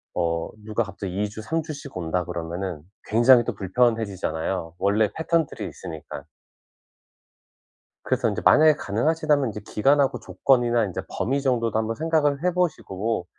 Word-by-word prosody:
어 85 -1 -1
누가 110 +2 -1
갑자기 100 -1 -4
2 105 - -1
주, 105 +2 -8
삼 160 +8 -2
주씩 145 - -8
온다 90 +1 -1
그러면은 85 -1 -5 0.2
굉장히 120 +2 +5
또 120 - -3
불편해지잖아요, 95 -6 -1
원래 105 +2 +2
패턴들이 160 - -1
있으니까. 80 -4 -8 1.8
그래서 - - +1
인제 - - -2
만약에 155 0 +6
가능하시다면 150 +5 +1
인제 105 0 -7
기간하고 140 +4 +2
조건이나 120 -3 +2
인제 95 - -4
범위 140 +4 -1
정도도 115 -5 0
한번 110 +1 -2
생각을 155 -2 +1
해 180 0 +2
보시고 115 - -1
110 Hz, 345 characters per minute, -24 LUFS, 95-140 Hz, 1.8 s, 만약에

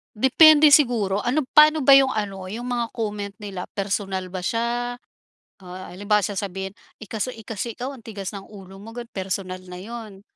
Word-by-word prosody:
Depende 300 +6 +7
siguro. 220 -8 0
Ano 265 +6 +1 0.2
paano 305 +1 +7
ba 275 0 +7
iyung 270 -1 +4
ano, 195 -3 -4
iyung 225 +6 -6
mga 240 -2 -2
comment 205 -3 -4
nila, 195 -3 -6
personal 195 -2 -3
ba 180 0 -6
siya, 240 +2 -2 0.6
ah, 185 +1 -9
halimbawa 205 +1 +1
sasabihin, 195 -1 -5 0.2
"Eh, 215 - -10
kasi 220 +4 -3
eh, 225 - -13
kasi, 225 +1 -5
ikaw, 260 +3 -4
ang 250 - -14
tigas 205 -2 -7
ng 200 - -7
ulo 195 -1 -12
mo," 225 - -10
ganoon. 235 0 -9
Personal 185 -1 -4
na 180 -1 -10
iyun. 215 -1 -9
210 Hz, 180 wpm, -23 LUFS, 195-240 Hz, 0.6 s, Depende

